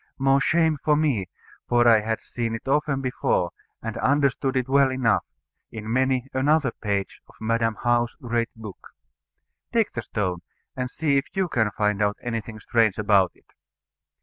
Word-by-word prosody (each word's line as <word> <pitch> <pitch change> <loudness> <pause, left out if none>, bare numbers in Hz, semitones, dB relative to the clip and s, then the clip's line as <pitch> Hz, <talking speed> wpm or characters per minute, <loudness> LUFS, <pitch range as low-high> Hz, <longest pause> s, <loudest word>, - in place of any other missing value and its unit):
More 135 0 +3
shame 160 -1 +2
for 150 - +3
me, 135 -12 0 0.4
for 120 0 +4
I 115 -2 +7
had 110 +1 -2
seen 115 -2 -3
it 115 - -9
often 140 0 +1
before, 125 -8 0 0.3
and 115 -1 -4
understood 140 -1 +1
it 130 0 0
well 135 0 +4
enough, 125 -4 +2 0.5
in 110 0 -5
many 130 0 +1
another 140 0 +2
page 100 -3 -3
of - - -19
Madam 115 0 0
How's 120 0 +1
great 120 -1 -2
book. 110 -4 -11 0.8
Take 230 -3 +2
the 120 - -3
stone, 95 -5 -2 0.4
and 125 0 -3
see 145 0 +1
if 135 - 0
you 190 -1 +1
can 110 -9 +1
find 105 0 0
out 105 0 +1
anything 115 -2 -4
strange 110 -2 +2
about 100 -4 +3
it. - - -28
120 Hz, 165 wpm, -24 LUFS, 110-135 Hz, 0.8 s, I